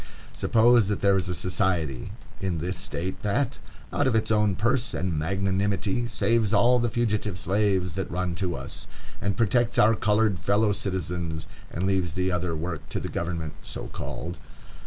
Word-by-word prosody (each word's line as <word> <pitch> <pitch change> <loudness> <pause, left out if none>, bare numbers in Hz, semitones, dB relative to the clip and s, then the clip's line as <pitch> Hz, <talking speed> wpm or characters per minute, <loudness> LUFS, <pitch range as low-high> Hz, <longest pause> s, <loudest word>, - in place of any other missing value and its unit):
Suppose 115 -1 +4
that 105 - -1
there 100 -1 +4
is 95 -1 0
a 90 - -1
society 90 -6 0 0.3
in 95 -3 -1
this 90 +4 -2
State 95 -1 -3
that 120 +6 0 0.3
out 145 - +2
of 125 - +2
its 110 0 +1
own 105 -3 +3
purse 120 +4 +1
and 95 -2 -1
magnanimity 95 +6 0
saves 110 -1 +1
all 125 +1 +5
the 120 0 +1
fugitive 105 -4 0
slaves 95 -2 +1
that 95 +1 -3
run 90 0 -1
to 90 -1 -2
us, - - -5 0.3
and 100 -1 -1
protects 120 +1 +2
our 110 +1 +6
colored 105 -3 +2
fellow 105 +1 +2
citizens, 90 -5 -2 0.2
and 90 - -2
leaves 95 -4 0
the 90 0 0
other 90 -1 -1
work 85 0 -5
to - - -2
the - - -5
government, 85 -3 -3
so - - -6
called. 85 +1 -5
95 Hz, 170 wpm, -26 LUFS, 90-110 Hz, 0.3 s, our